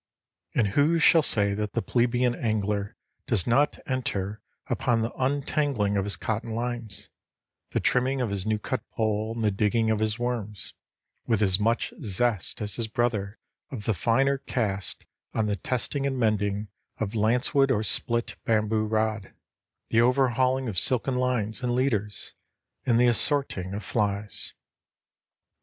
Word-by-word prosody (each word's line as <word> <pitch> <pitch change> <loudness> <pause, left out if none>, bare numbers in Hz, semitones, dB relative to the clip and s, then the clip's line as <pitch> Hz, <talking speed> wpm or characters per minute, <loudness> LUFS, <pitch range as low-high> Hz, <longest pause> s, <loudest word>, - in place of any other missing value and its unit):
And 110 -5 +3
who 150 +9 +3
shall 165 0 +6
say 100 -8 +1
that 105 0 -3
the 115 - 0
plebeian 120 0 +2
angler 105 -2 -1 0.3
does 115 -10 +2
not 135 +5 +3
enter 105 -6 -2 0.2
upon 115 -2 +1
the 115 - -2
untangling 135 -5 0
of 100 -1 +1
his 100 - -1
cotton 110 -1 -3
lines, 115 -5 -4 0.6
the - - 0
trimming 130 +2 +2
of 120 -5 -1
his 100 -2 -2
new 110 +1 0
cut 130 +4 -3
pole, 110 0 0
and 115 - -3
the 105 - +3
digging 110 +3 +1
of 110 - +1
his 110 0 0
worms, 120 -4 -4 0.5
with 110 -2 +2
as 95 -1 +3
much 115 +3 +1
zest 110 -1 -1
as 105 -2 -3
his 115 -2 -1
brother 110 -3 -1 0.3
of 110 -7 -6
the 110 - +2
finer 135 +8 +2
cast 100 -7 -3 0.3
on 110 - +2
the 105 -1 0
testing 130 - -2
and 135 -1 -2
mending 105 -3 0 0.3
of 110 -1 -3
lancewood 125 +5 +2
or 110 -5 +2
split 115 +2 -1
bamboo 110 -1 +1
rod, 110 -2 -1 0.6
the 115 - +5
overhauling 130 +1 +2
of 100 -6 0
silken 130 +4 +1
lines 125 -4 0
and 120 -1 0
leaders, 110 -6 -1 0.5
and 120 -2 +4
the 125 - +5
assorting 120 - +1
of 105 - -5
flies. 105 0 -2
110 Hz, 150 wpm, -27 LUFS, 105-125 Hz, 0.6 s, shall